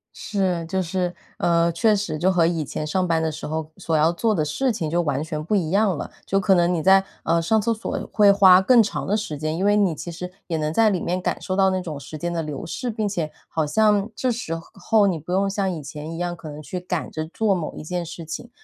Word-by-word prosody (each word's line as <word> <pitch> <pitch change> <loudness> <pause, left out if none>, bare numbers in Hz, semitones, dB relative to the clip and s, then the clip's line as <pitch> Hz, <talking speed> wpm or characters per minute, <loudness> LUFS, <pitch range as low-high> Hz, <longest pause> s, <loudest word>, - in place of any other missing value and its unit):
是， 185 -5 -1
就 190 +2 -1
是， 180 0 -2 0.2
呃， 170 0 +2
确 215 +6 +3
实 195 -6 -2
就 185 +4 +2
和 175 -3 +3
以 165 -2 -1
前 150 - -4
上 185 +2 0
班 165 -1 +1
的 160 -1 0
时 150 - -7
候 160 0 -4
所 165 -4 -2
要 155 +2 +4
做 215 +6 +1
的 160 -6 +1
事 250 - 0
情 165 -8 -3
就 170 +2 +1
完 145 -3 -1
全 155 -2 -4
不 210 - 0
一 175 -6 0
样 195 0 +2
了。 - - -6
就 195 - +1
可 195 0 +4
能 175 0 +3
你 165 - 0
在， 190 +2 +6 0.2
呃， 165 0 +2
上 220 +6 +2
厕 230 +2 +1
所 220 - -5
会 205 -2 +6
花 190 -2 +7
更 235 +4 +6
长 215 - -2
的 205 - +1
时 180 -9 -3
间， 155 +1 -2
因 180 - -2
为 205 0 +4
你 200 -5 +3
其 170 - -7
实 180 +2 -7 0.2
也 165 - -1
能 155 0 -1
在 225 +4 +4
里 190 -3 0
面 180 +1 -1
感 - - -1
受 185 - -2
到 190 0 +4
那 185 -1 -1
种 155 -5 -6
时 155 +2 -8
间 175 +2 -3
的 165 - -1
流 150 -3 -5
逝， 250 +8 -4
并 215 -2 -1
且 170 -6 -2 0.2
好 160 -1 -1
像 210 +5 +2
这 255 +3 0
时 220 -8 -3 0.2
候 205 +2 +2
你 175 -4 0
不 160 +4 -8
用 195 +2 +2
像 195 -1 -1
以 165 -4 -5
前 150 +2 -7
一 165 - -6
样， 175 0 -2
可 165 -2 -9
能 150 +1 -8
去 180 +4 -5
赶 180 -2 -4
着 155 0 -4
做 205 +4 +1
某 175 -5 -3
一 - - -7
件 175 +2 -3
事 165 0 -8
情， 160 +9 -6
175 Hz, 290 characters per minute, -23 LUFS, 160-200 Hz, 0.2 s, 花